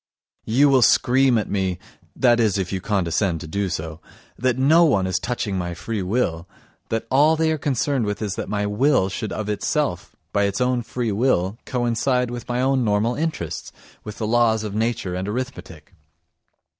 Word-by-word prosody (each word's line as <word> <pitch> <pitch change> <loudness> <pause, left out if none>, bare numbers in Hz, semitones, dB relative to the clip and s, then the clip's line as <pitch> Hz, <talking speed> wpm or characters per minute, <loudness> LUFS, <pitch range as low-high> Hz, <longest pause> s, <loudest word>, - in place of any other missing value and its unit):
You 130 +6 +4
will 135 -2 +4
scream 130 +1 +4
at 105 - -1
me 95 -3 -1 0.4
(that 120 -2 +3
is, 110 -4 +2
if 95 -1 -3
you 95 - -2
condescend 95 -3 0
to 80 - -7
do 100 +4 -2
so) 80 -1 -5 0.3
that 125 +1 0
no 155 +6 +5
one 100 - +3
is 95 - 0
touching 110 -6 -2
my 85 -1 -4
free 105 +4 -4
will, 90 -4 -1 0.4
that 115 0 -2
all 150 +4 +5
they 160 0 +1
are 155 - -1
concerned 135 -3 0
with 105 -1 -3
is 105 -3 -2
that - - -5
my 105 -1 -1
will 105 0 +2
should 100 +1 -4
of 105 - -4
itself, 105 - -2 0.2
of 100 - +2
its 100 -1 0
own 125 -1 +1
free 120 -1 -3
will, 105 -2 +1
coincide 125 0 0
with 120 0 -7
my 120 +1 0
own 130 -1 +2
normal 105 +2 +1
interests, 125 - -4 0.3
with 105 - -8
the 110 - -3
laws 110 -1 +2
of 105 -2 -5
nature 110 -4 -1
and 90 +2 -3
arithmetic. 105 - -6
110 Hz, 185 wpm, -22 LUFS, 95-125 Hz, 0.4 s, no